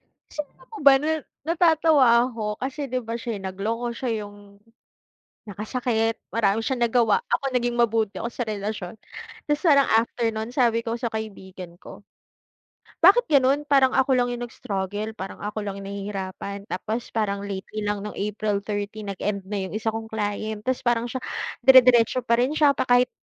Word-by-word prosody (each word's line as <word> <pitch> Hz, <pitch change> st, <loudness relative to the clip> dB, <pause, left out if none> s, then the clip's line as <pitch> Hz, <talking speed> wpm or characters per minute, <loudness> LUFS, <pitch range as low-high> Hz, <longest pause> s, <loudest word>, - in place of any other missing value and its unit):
hmm. -, -, -47 dB, 0.3 s
Sino 300 Hz, -2 st, -6 dB
ka -, -, -18 dB
pa 445 Hz, -, -10 dB
ba 280 Hz, -1 st, +9 dB
nun? 315 Hz, +1 st, 0 dB, 0.3 s
Natatawa 320 Hz, -5 st, +4 dB, 0.2 s
ako 215 Hz, -3 st, -4 dB
kasi, 275 Hz, +3 st, -3 dB
'di 255 Hz, 0 st, -1 dB
ba, 230 Hz, -1 st, -6 dB
siya 235 Hz, -2 st, -4 dB
yung 190 Hz, -, -6 dB
nagloko, 220 Hz, +6 st, -3 dB
siya 255 Hz, -1 st, -2 dB
yung 205 Hz, 0 st, -11 dB, 1.1 s
nakasakit. 225 Hz, +2 st, -1 dB, 0.2 s
Marami 220 Hz, 0 st, +1 dB
siyang 260 Hz, -3 st, -1 dB
nagawa, 240 Hz, -, +3 dB
ako -, -, 0 dB
naging 240 Hz, -1 st, 0 dB
mabuti 225 Hz, -3 st, +1 dB
ako 235 Hz, -, -3 dB
sa 240 Hz, -1 st, -4 dB
relasyon. 210 Hz, -2 st, -4 dB, 0.5 s
Tapos 295 Hz, 0 st, 0 dB
parang 280 Hz, -4 st, +5 dB
after 230 Hz, +1 st, +2 dB
no'n 220 Hz, +1 st, -4 dB
sabi 235 Hz, -4 st, +3 dB
ko 230 Hz, 0 st, -3 dB
sa 235 Hz, -1 st, -3 dB
kaibigan 190 Hz, -5 st, -7 dB
ko. -, -, -12 dB, 1.0 s
"Bakit 400 Hz, +8 st, +7 dB
ganun 280 Hz, 0 st, +3 dB
parang 270 Hz, -3 st, +4 dB
ako 265 Hz, 0 st, +3 dB
lang 245 Hz, -1 st, +2 dB
yung 240 Hz, 0 st, -4 dB
nag-struggle? 205 Hz, -1 st, -4 dB
Parang 190 Hz, -1 st, -7 dB
ako 210 Hz, +1 st, -4 dB
lang 200 Hz, -1 st, -5 dB
yung 195 Hz, -, -8 dB
nahihirapan. 200 Hz, 0 st, -5 dB
Tapos, 220 Hz, +5 st, -4 dB
parang 200 Hz, -3 st, -1 dB
lately 200 Hz, +2 st, -5 dB
lang 205 Hz, 0 st, -1 dB
nong 210 Hz, -, -7 dB
April 210 Hz, 0 st, -1 dB
13 205 Hz, 0 st, -4 dB
nag-end 200 Hz, +1 st, -3 dB
na 200 Hz, -2 st, -2 dB
yung -, -, -9 dB
isa 220 Hz, +1 st, -1 dB
kong 225 Hz, 0 st, -5 dB
client. 215 Hz, 0 st, -3 dB
Tas 260 Hz, 0 st, -1 dB
parang 240 Hz, -1 st, +1 dB
siya 260 Hz, +2 st, -4 dB, 0.4 s
dire-diretso 250 Hz, -1 st, +6 dB
pa 235 Hz, -1 st, +3 dB
rin 255 Hz, +4 st, +2 dB
siya 295 Hz, -2 st, +5 dB
pa -, -, 0 dB
kahit" 245 Hz, 0 st, +5 dB
225 Hz, 180 wpm, -24 LUFS, 205-255 Hz, 1.1 s, ba